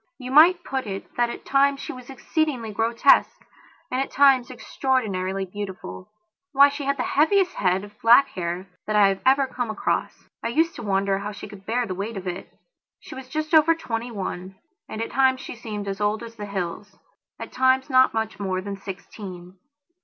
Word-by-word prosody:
You, 255 -1 -7
might 340 +5 +6
put 265 -3 -3
it 195 -1 -7
that 240 -1 +1
at - - -8
times 275 0 +3
she 280 - -6
was 255 -1 -12
exceedingly 270 -3 -2
grotesque 230 +5 +3 0.5
and 255 +1 0
at 275 - -3
times 270 -3 +4
extraordinarily 200 -8 -2
beautiful. 185 - -8 0.4
Why, 280 +1 +7
she 285 0 -6
had 280 0 0
the 250 - -1
heaviest 365 +5 +2
head 185 0 0
of 205 +1 -14
black 240 +5 +6
hair 175 +1 -4 0.2
that 215 - -1
I 205 -1 +6
have 195 0 -3
ever 270 +1 +5
come 245 -3 -4
across; 215 - -2
I - - -2
used 325 +8 +1
to - - -6
wonder 195 -2 0
how 205 +1 -5
she 205 - -9
could 200 -1 -14
bear 240 +2 0
the 190 - -4
weight 200 +4 -5
of 190 - -7
it. 180 +1 -6 0.5
She - - -12
was 260 -1 -9
just 310 +3 -4
over 320 +1 +6
twenty 235 -6 -4
one 190 -3 -6 0.3
and 220 - -4
at - - -7
times 260 -1 +3
she - - -7
seemed 210 -3 -6
as 195 +1 -4
old 210 +2 0
as 230 0 -10
the 205 -2 -7
hills, 195 +1 -5 0.4
at - - -7
times 260 0 +2
not 260 -2 +4
much 220 -3 -3
more 190 -2 -2
than 200 +1 -6
sixteen. 185 -2 -9
230 Hz, 200 wpm, -24 LUFS, 195-265 Hz, 0.5 s, Why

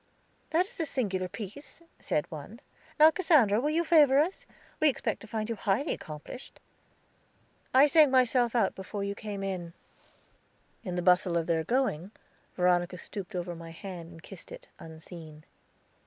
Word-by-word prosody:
"That 345 +3 +2
is 395 - -14
a 325 - 0
singular 190 -10 -1
piece," 225 - -9 0.2
said 150 - -1
one. 160 +9 -9 0.4
"Now, 310 +1 +8
Cassandra, 285 - +3
will 295 - 0
you 330 +3 +1
favor 300 -5 +5
us? 325 +7 0 0.3
We 310 - +5
expect 270 - -2
to 225 - -11
find 215 0 -3
you 230 - -2
highly 210 +8 0
accomplished." 155 - -9 1.1
"I 265 +3 +7
sang 300 0 +6
myself 250 -2 +3
out 220 -5 +2
before 200 +1 -6
you 200 0 -2
came 200 -1 -6
in." 180 -3 -4 1.1
In 180 -5 -4
the 180 - -2
bustle 180 0 +3
of 165 - 0
their 165 -1 0
going, 235 - 0 0.5
Veronica 180 0 +2
stooped 195 +2 -8
over 175 0 -3
my 165 0 -9
hand 170 0 -8
and 165 -1 -14
kissed - - -11
it, - - -10
unseen. 160 -1 -11
200 Hz, 160 wpm, -29 LUFS, 175-270 Hz, 1.1 s, Now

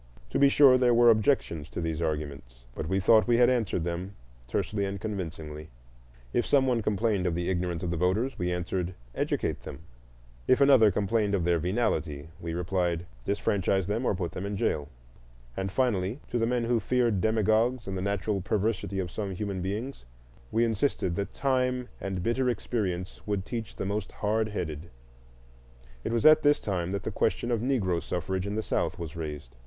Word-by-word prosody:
To - - 0
be 140 - +6
sure, 135 -2 +6
there 125 -2 +4
were 120 0 +7
objections 105 - +1
to - - -5
these 80 -1 -2
arguments, 70 -7 -4
but 75 - -5
we 95 +1 +1
thought 110 +4 +5
we 120 -1 +4
had 120 +1 +5
answered 110 -8 0
them 90 +3 -4 0.3
tersely 100 - -1
and 100 0 -3
convincingly; 80 -7 -5 0.6
if 120 - +2
some 135 -2 +3
one 125 -3 +1
complained 105 -2 0
of 85 - 0
the 85 +2 -1
ignorance 90 -2 -2
of 85 - -1
voters, 95 +10 0
we 90 0 0
answered, 90 0 -2 0.2
"Educate - - -1
them." - - -8 0.7
If 130 - +4
another 135 -6 +7
complained 105 +1 +1
of 90 - 0
their 85 -1 +2
venality, 85 -6 -1
we 85 -2 -4
replied, 90 -1 -1 0.2
"Disfranchise 100 +1 0
them 105 +6 -1
or 105 - +1
put 90 -2 -3
them 90 - -5
in 100 0 -3
jail." 75 -5 -1 0.7
And, 95 0 -3
finally, 110 -1 0
to 120 - 0
the 115 - +2
men 120 0 0
who 115 0 +2
feared 120 -5 +1
demagogues 110 +3 +2
and 95 - -4
the 95 - -2
natural 100 +1 -1
perversity 100 0 -1
of 90 -3 -2
some 100 -2 -4
human 100 -1 -3
beings 105 - -4 0.5
we 115 +1 +3
insisted 110 -5 0
that 100 - -2
time 125 -2 0
and 95 -2 -3
bitter 125 +4 +1
experience 95 -6 -3
would 100 -2 -1
teach 115 -2 -5
the - - -4
most 100 +1 -3
hardheaded. 105 -7 -2 1.1
It - - -2
was 115 +4 0
at 155 0 +8
this 145 0 +4
time 90 -4 -2
that 100 0 -3
the - - -3
question 120 - 0
of 115 -2 +1
Negro 105 -10 0
suffrage 95 +2 -3
in 100 - -3
the 110 - -1
South - - -1
was 85 -2 -6
raised. 75 -7 -6
100 Hz, 185 wpm, -28 LUFS, 90-115 Hz, 1.1 s, at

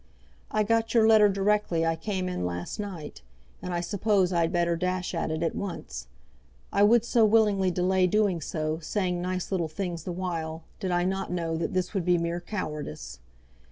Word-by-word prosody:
I 215 - +1
got 225 +2 +1
your 220 -1 +6
letter 215 -2 +7
directly 195 -4 +1
I 165 0 +1
came 185 +1 -3
in 180 - -3
last 90 - -4
night, 180 - -6 0.4
and 180 - -5
I 175 -1 -1
suppose 190 0 +1
I 170 - +2
had 165 0 +1
better 170 -1 +1
dash 180 +1 -2
at 165 - -1
it 160 +1 -2
at 165 - 0
once. 170 - -5 0.7
I 200 - +3
would 225 +3 +5
so 235 -1 +3
willingly 210 -3 +4
delay 185 +1 +2
doing 200 -3 +1
so, 155 +1 -2
saying 180 +1 -1
nice 185 +1 -3
little 175 -4 0
things 170 0 -4
the 180 - -4
while, 165 -3 -4 0.2
did 190 - -2
I 175 0 +2
not 190 +1 -2
know 165 -2 -1
that 165 - -2
this 185 +1 -1
would 195 -4 0
be 180 0 +3
mere 170 +1 -2
cowardice. 150 - -5
180 Hz, 190 wpm, -27 LUFS, 165-200 Hz, 0.7 s, letter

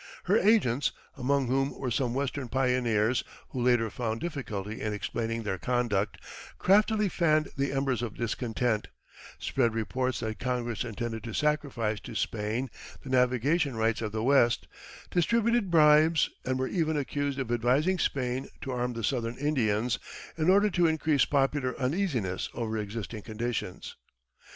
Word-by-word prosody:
Her 190 - +2
agents 180 - +3 0.2
among 140 +1 +1
whom 135 +3 0
were 130 -2 -3
some 120 0 0
Western 140 -1 -2
pioneers 125 -3 +1 0.3
who 125 - -4
later 120 -3 +3
found 115 -2 -2
difficulty 110 - -4
in 105 -1 -1
explaining 115 +2 -3
their 95 -3 -2
conduct 110 -5 0 0.4
craftily 210 +2 +3
fanned 155 -4 +2
the 140 0 0
embers 135 -3 0
of 115 -3 -4
discontent, 115 -1 -1 0.5
spread 120 -4 0
reports 130 +3 -1
that 110 -1 -4
Congress 120 -3 -2
intended 115 -1 -4
to 115 - -5
sacrifice 135 -8 0
to - - -9
Spain 110 +4 -2 0.3
the 135 - -7
navigation 130 +3 +2
rights 115 0 +1
of 110 -2 -2
the 110 +1 -2
West, 120 -3 +3 0.4
distributed 230 +3 +2
bribes, 155 -1 +5
and 130 0 -1
were 130 0 -1
even 160 -4 0
accused 145 0 -2
of 130 -4 -3
advising 130 +10 +2
Spain 130 -3 -1
to 135 - -4
arm 125 0 -1
the 115 -1 -5
Southern 115 0 -1
Indians 125 -6 +1 0.4
in 160 +1 +1
order 200 +2 +5
to 175 -1 +3
increase 155 -3 +2
popular 135 -2 0
uneasiness 125 - -1
over 110 -2 -2
existing 110 +1 -4
conditions. 115 -3 -4
125 Hz, 145 wpm, -29 LUFS, 115-145 Hz, 0.5 s, bribes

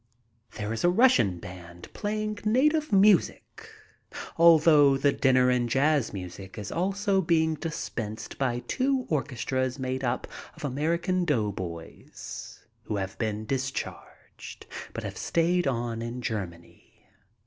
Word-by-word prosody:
There 105 +1 -3
is 115 - -4
a 175 - +5
Russian 180 - +4
band 85 0 -11
playing 215 0 -3
native 300 +8 +2
music 200 -2 +2 0.7
all 170 0 +7
through 150 -3 +5
the 140 +1 +3
dinner 130 -2 +3
and 120 -1 +1
jazz 140 0 +2
music 95 0 -8
is 105 -1 -6
also 195 +2 +1
being 160 -2 +2
dispensed 115 -9 -5
by 125 -3 0
two 265 0 0
orchestras 130 -3 -1
made 130 0 -3
up 120 0 -1 0.3
of - - -7
American 170 +6 0
doughboys 100 - -5 0.2
who 105 - -3
have 95 -1 -3
been 110 -1 -2
discharged, 135 +2 -6 0.3
but - - -6
have - - -6
stayed 175 0 +1
on 120 -3 -2
in 120 +2 -5
Germany. 90 -7 -7
135 Hz, 125 wpm, -27 LUFS, 110-175 Hz, 0.7 s, all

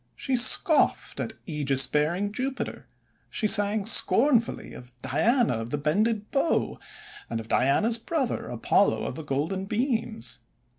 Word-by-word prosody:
She 270 - -2
scoffed 260 +5 +2
at - - -4
aegis 140 -4 +2
bearing 155 +9 -1
Jupiter; 265 +3 -5 0.4
she 220 - -2
sang 205 -1 +3
scornfully 235 +2 +3
of 125 0 -12
Diana 160 - +1
of 115 +1 -6
the 145 - -2
Bended 210 +9 -1
Bow 285 +4 0 0.5
and 115 - -3
of 110 - -8
Diana's 210 - +1
brother, 270 0 -3
Apollo - - +1
of - - -4
the 160 - -8
Golden 155 +7 -3
Beams. 210 - -2
205 Hz, 135 wpm, -26 LUFS, 145-235 Hz, 0.5 s, sang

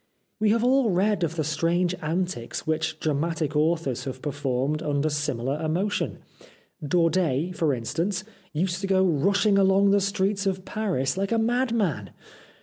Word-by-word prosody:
We 215 0 +3
have 230 +2 +2
all 255 -1 +3
read 195 +1 +1
of 165 0 -1
the 160 - 0
strange 170 +4 +1
antics 160 -6 -3
which 160 0 -1
dramatic 155 0 -1
authors 150 -5 0
have 130 -1 -5
performed 145 +1 -1
under 145 +1 0
similar 145 -1 -2
emotion. 180 +7 -1 0.6
Daudet, 165 0 +1
for 160 -3 +1
instance, 160 - -2 0.3
used 180 +3 -1
to 195 - -2
go 190 -1 +3
rushing 195 +5 +3
along 195 +1 +4
the 200 0 +4
streets 200 0 0
of 190 -1 -2
Paris 185 -9 -1
like 195 +2 -1
a 230 - +2
madman. 225 - 0
170 Hz, 145 wpm, -25 LUFS, 150-195 Hz, 0.6 s, along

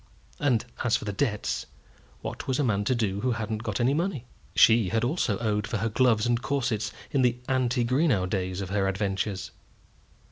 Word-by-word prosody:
And 125 -6 +2 0.2
as 120 -2 +3
for - - -8
the 105 - -2
debts, 105 -3 -1 0.6
what - - -5
was 130 - +1
a 145 - +1
man 105 -5 +1
to 130 - +2
do 100 -4 -1
who 125 -1 +1
hadn't 110 -1 -3
got 105 -2 -3
any 125 +3 +3
money? 160 -5 -1 0.3
She 110 -5 +5
also 120 - +1
had 115 - -5
owed 105 -1 0
for 115 - -2
her 115 +3 -1
gloves 115 -1 +3
and 120 0 +1
corsets 120 -6 -1 0.2
in 135 - +2
the 125 -1 +2
ante 125 -2 +1
Greenow 125 - +2
days 95 0 -2
of 95 -1 -5
her 100 -1 +1
adventures. 95 0 -2
115 Hz, 190 wpm, -27 LUFS, 105-125 Hz, 0.6 s, She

